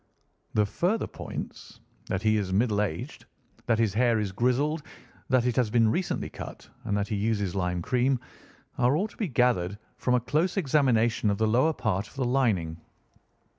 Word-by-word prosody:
"The 105 Hz, -, +4 dB
further 180 Hz, -, 0 dB
points, -, -, -8 dB, 0.3 s
that 95 Hz, +3 st, -2 dB
he 110 Hz, 0 st, +3 dB
is 100 Hz, -3 st, -2 dB
middle 105 Hz, +1 st, +2 dB
aged, 100 Hz, -7 st, -4 dB, 0.4 s
that 115 Hz, -2 st, +3 dB
his 110 Hz, -4 st, +1 dB
hair 120 Hz, +1 st, +3 dB
is 105 Hz, -3 st, -1 dB
grizzled, 130 Hz, -, +1 dB, 0.5 s
that 130 Hz, -2 st, +3 dB
it 125 Hz, -2 st, +1 dB
has 125 Hz, -4 st, +3 dB
been 115 Hz, 0 st, +4 dB
recently 180 Hz, +6 st, -1 dB
cut, -, -, -9 dB, 0.2 s
and 100 Hz, -, 0 dB
that 100 Hz, 0 st, -1 dB
he 105 Hz, -, -1 dB
uses 105 Hz, -3 st, 0 dB
lime 90 Hz, -2 st, -1 dB
cream, 125 Hz, +3 st, +1 dB, 0.6 s
are 125 Hz, +3 st, +4 dB
all 200 Hz, +6 st, 0 dB
to -, -, -18 dB
be 215 Hz, -, -1 dB
gathered 115 Hz, -, +1 dB, 0.2 s
from 125 Hz, -, +1 dB
a -, -, +3 dB
close 155 Hz, -, 0 dB
examination 125 Hz, -, +2 dB
of 100 Hz, -, 0 dB
the 110 Hz, -, +2 dB
lower 130 Hz, +9 st, +3 dB
part 105 Hz, -6 st, -1 dB
of -, -, -18 dB
the 135 Hz, -2 st, -1 dB
lining. 100 Hz, -11 st, +1 dB
115 Hz, 180 wpm, -27 LUFS, 105-130 Hz, 0.6 s, The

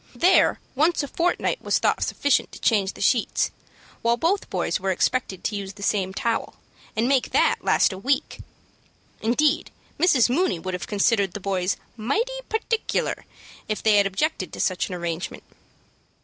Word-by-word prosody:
There 370 Hz, +2 st, +4 dB
once 315 Hz, +4 st, +2 dB
a -, -, -3 dB
fortnight 350 Hz, -, 0 dB
was -, -, +1 dB
thought -, -, +1 dB
sufficient 285 Hz, -1 st, +1 dB
to -, -, -10 dB
change 200 Hz, -4 st, +2 dB
the -, -, -11 dB
sheets, 230 Hz, +3 st, +2 dB, 0.5 s
while 235 Hz, +1 st, +2 dB
both 365 Hz, +8 st, 0 dB
boys -, -, -1 dB
were 190 Hz, +1 st, -2 dB
expected 190 Hz, 0 st, 0 dB
to 210 Hz, -, -1 dB
use 195 Hz, -1 st, -5 dB
the 200 Hz, 0 st, -10 dB
same 195 Hz, -2 st, 0 dB
towel, 230 Hz, +4 st, -2 dB, 0.4 s
and 225 Hz, +2 st, +1 dB
make 265 Hz, -1 st, +2 dB
that -, -, +2 dB
last -, -, +3 dB
a 190 Hz, -, -7 dB
week. 275 Hz, +7 st, -1 dB, 0.8 s
Indeed, 300 Hz, +8 st, +2 dB, 0.3 s
Mrs. 280 Hz, -10 st, +5 dB
Mooney 280 Hz, -, +1 dB
would 185 Hz, +3 st, -5 dB
have 180 Hz, -, -4 dB
considered 200 Hz, -2 st, +1 dB
the -, -, -5 dB
boys 190 Hz, -1 st, -1 dB, 0.2 s
"mighty 430 Hz, -, -1 dB, 0.2 s
particular" 445 Hz, 0 st, -1 dB, 0.4 s
if 215 Hz, -, -2 dB
they 215 Hz, -2 st, +5 dB
had 200 Hz, -1 st, +4 dB
objected 195 Hz, -, -2 dB
to -, -, -7 dB
such 185 Hz, +1 st, 0 dB
an 180 Hz, -, -4 dB
arrangement. 170 Hz, 0 st, -4 dB
225 Hz, 165 wpm, -24 LUFS, 195-285 Hz, 0.8 s, Mrs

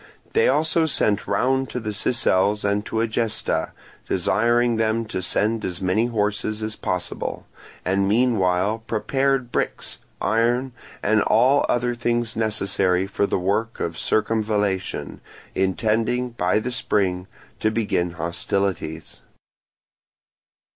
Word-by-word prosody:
They 460 Hz, +2 st, +4 dB
also 160 Hz, +1 st, +2 dB
sent 105 Hz, -8 st, +1 dB
round 130 Hz, +6 st, +1 dB
to 125 Hz, -, -3 dB
the 110 Hz, -2 st, -4 dB
Sicels 105 Hz, -3 st, +1 dB
and 100 Hz, 0 st, +1 dB
to 110 Hz, -, -1 dB
Egesta, 115 Hz, -1 st, -1 dB, 0.4 s
desiring 120 Hz, +1 st, +2 dB
them 110 Hz, +1 st, +1 dB
to 100 Hz, -4 st, -4 dB
send 110 Hz, +4 st, 0 dB
them -, -, -2 dB
as 90 Hz, -1 st, -4 dB
many 95 Hz, +5 st, +1 dB
horses 105 Hz, -1 st, -1 dB
as 110 Hz, 0 st, -3 dB
possible, 90 Hz, -1 st, -3 dB, 0.4 s
and 95 Hz, +2 st, +2 dB
meanwhile 105 Hz, -3 st, +2 dB
prepared 135 Hz, +2 st, 0 dB
bricks, -, -, -2 dB, 0.2 s
iron, 120 Hz, +4 st, +1 dB, 0.3 s
and 110 Hz, +1 st, +3 dB
all 130 Hz, +7 st, +4 dB
other 120 Hz, 0 st, +1 dB
things 120 Hz, -1 st, -1 dB
necessary 100 Hz, -4 st, +1 dB
for 100 Hz, +1 st, 0 dB
the -, -, 0 dB
work 105 Hz, +5 st, -1 dB
of 80 Hz, -, -2 dB
circumvallation, 105 Hz, -3 st, -1 dB, 0.3 s
intending 110 Hz, +6 st, 0 dB
by 90 Hz, -3 st, +1 dB
the 120 Hz, +4 st, -2 dB
spring 95 Hz, -6 st, 0 dB, 0.3 s
to 110 Hz, -, +2 dB
begin 100 Hz, -6 st, 0 dB
hostilities. 85 Hz, -1 st, -3 dB
110 Hz, 120 wpm, -23 LUFS, 95-120 Hz, 0.4 s, They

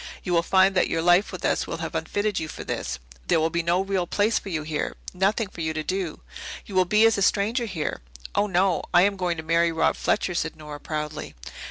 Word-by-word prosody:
You 180 Hz, -, -2 dB
will 170 Hz, -, +4 dB
find 190 Hz, +2 st, +4 dB
that 185 Hz, -, +3 dB
your 165 Hz, 0 st, 0 dB
life 175 Hz, +3 st, +4 dB
with -, -, -5 dB
us -, -, +1 dB
will -, -, -4 dB
have -, -, -5 dB
unfitted 205 Hz, 0 st, -1 dB
you 160 Hz, -, -4 dB
for -, -, -7 dB
this. -, -, -3 dB, 0.3 s
There -, -, +3 dB
will 160 Hz, +1 st, +1 dB
be 170 Hz, +1 st, 0 dB
no 170 Hz, +2 st, +2 dB
real 195 Hz, -2 st, -1 dB
place 210 Hz, +5 st, +2 dB
for 200 Hz, -, -9 dB
you 160 Hz, -4 st, -2 dB
here 155 Hz, -1 st, -3 dB, 0.2 s
nothing 200 Hz, +4 st, +1 dB
for 175 Hz, -, -9 dB
you 160 Hz, 0 st, -1 dB
to 155 Hz, -, -2 dB
do. 185 Hz, -1 st, -3 dB, 0.4 s
You 200 Hz, -, -10 dB
will 185 Hz, -1 st, +4 dB
be 210 Hz, +5 st, +4 dB
as 225 Hz, -2 st, +4 dB
a -, -, -1 dB
stranger 215 Hz, +5 st, +2 dB
here." 165 Hz, -, -3 dB, 0.3 s
"Oh, 205 Hz, -, +2 dB
no. 185 Hz, -1 st, +2 dB
I 175 Hz, -, +8 dB
am 200 Hz, 0 st, +2 dB
going 180 Hz, -3 st, -1 dB
to 160 Hz, -, -5 dB
marry 165 Hz, +1 st, +2 dB
Rob 160 Hz, -, +2 dB
Fletcher," 190 Hz, -3 st, 0 dB
said 165 Hz, -2 st, -2 dB
Nora 150 Hz, -1 st, -9 dB
proudly. 150 Hz, 0 st, -5 dB
180 Hz, 240 wpm, -25 LUFS, 160-195 Hz, 0.4 s, I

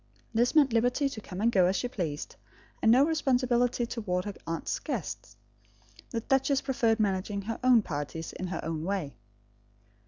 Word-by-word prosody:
This 240 Hz, +6 st, +2 dB
meant 280 Hz, -6 st, +5 dB
liberty 245 Hz, +5 st, +2 dB
to 230 Hz, -5 st, -7 dB
come 185 Hz, -1 st, -7 dB
and 230 Hz, +2 st, +3 dB
go 185 Hz, -5 st, +4 dB
as 190 Hz, -, +1 dB
she 245 Hz, -, -1 dB
pleased; 165 Hz, -, -4 dB, 0.5 s
and 225 Hz, -, +5 dB
no 260 Hz, +4 st, +6 dB
responsibility 250 Hz, -6 st, +1 dB
towards 190 Hz, -6 st, -2 dB
her 205 Hz, -, -4 dB
aunt's 165 Hz, 0 st, -2 dB
guests. -, -, -5 dB, 0.7 s
The 230 Hz, -, -3 dB
duchess 270 Hz, +2 st, +2 dB
preferred 230 Hz, -4 st, +1 dB
managing 200 Hz, 0 st, -1 dB
her 225 Hz, +3 st, -4 dB
own 250 Hz, -4 st, +6 dB
parties 155 Hz, 0 st, -5 dB
in 185 Hz, -, -5 dB
her 185 Hz, -, -3 dB
oven 160 Hz, -1 st, -4 dB
way. 180 Hz, -6 st, -2 dB
225 Hz, 165 wpm, -29 LUFS, 185-245 Hz, 0.7 s, no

